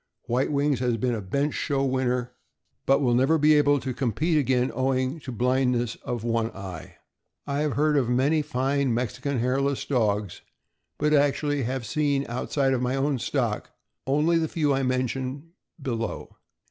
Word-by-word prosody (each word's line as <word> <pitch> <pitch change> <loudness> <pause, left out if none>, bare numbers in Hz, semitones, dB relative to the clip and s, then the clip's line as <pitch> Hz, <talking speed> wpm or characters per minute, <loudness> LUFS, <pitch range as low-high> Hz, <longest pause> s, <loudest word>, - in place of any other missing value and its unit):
White 125 +5 0
Wings 140 -2 +1
has 120 -2 0
been 125 +2 0
a 110 - -3
bench 140 +10 -1
show 140 -1 0
winner, 125 -2 0 0.6
but 135 +1 +4
will 125 -3 +2
never 135 +6 +3
be 155 0 +5
able 145 -1 +4
to 130 -1 -3
compete 135 - 0
again, 130 -3 +2
owing 130 +3 0
to 135 - -7
blindness 125 -1 +1
of 120 -3 -4
one 115 -1 0
eye. 95 -4 -8 0.5
I 140 0 -2
have 150 -2 0
heard 150 +1 +2
of 125 -4 +1
many 140 +6 +2
fine 140 -3 0
Mexican 125 +3 -2
Hairless 135 +3 0
Dogs, 105 -7 0 0.6
but 150 +1 +1
have 145 - +6
actually 145 0 0 0.2
seen, 140 +4 0
outside 135 +3 0
of 125 - 0
my 125 +1 0
own 135 -1 0
stock, - - -1 0.4
only 155 +5 +3
the 160 - 0
few 150 -3 +1
I 135 - +1
mention 130 +4 -2 0.3
below. 115 -5 -4
135 Hz, 165 wpm, -26 LUFS, 125-145 Hz, 0.6 s, have